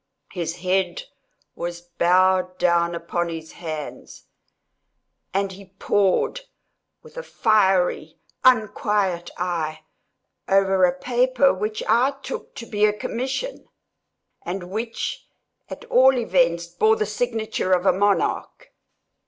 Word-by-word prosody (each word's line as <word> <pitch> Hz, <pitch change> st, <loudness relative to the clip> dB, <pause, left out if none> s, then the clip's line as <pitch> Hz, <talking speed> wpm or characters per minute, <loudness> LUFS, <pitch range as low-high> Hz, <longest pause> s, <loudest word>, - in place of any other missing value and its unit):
His 170 Hz, -2 st, -3 dB
head 185 Hz, -, 0 dB, 0.5 s
was 175 Hz, 0 st, -5 dB
bowed 180 Hz, +1 st, +2 dB
down 170 Hz, -1 st, +2 dB
upon 170 Hz, +1 st, -2 dB
his 160 Hz, -1 st, -7 dB
hands, 155 Hz, -4 st, -7 dB, 1.1 s
and 195 Hz, 0 st, -1 dB
he 190 Hz, 0 st, -14 dB
pored, 205 Hz, -, +1 dB, 0.6 s
with -, -, -16 dB
a -, -, -3 dB
fiery 195 Hz, -, +1 dB, 0.3 s
unquiet 210 Hz, -7 st, +2 dB
eye, 160 Hz, -3 st, -3 dB, 0.7 s
over 195 Hz, -1 st, +4 dB
a 180 Hz, -, +3 dB
paper 255 Hz, +3 st, +2 dB
which 210 Hz, +3 st, -3 dB
I 250 Hz, +5 st, +3 dB
took 265 Hz, -, -7 dB
to 230 Hz, -, -7 dB
be 210 Hz, -2 st, -2 dB
a 210 Hz, -, +2 dB
commission, 265 Hz, -, -4 dB, 0.7 s
and 180 Hz, 0 st, -6 dB
which, 225 Hz, +3 st, -4 dB, 0.4 s
at -, -, -8 dB
all 265 Hz, -, +5 dB
events, 170 Hz, -6 st, +2 dB
bore 195 Hz, +6 st, +2 dB
the 215 Hz, -, -1 dB
signature 220 Hz, -2 st, -2 dB
of 180 Hz, 0 st, +3 dB
a -, -, +5 dB
monarch. 205 Hz, -, -1 dB
190 Hz, 115 wpm, -23 LUFS, 175-220 Hz, 1.1 s, all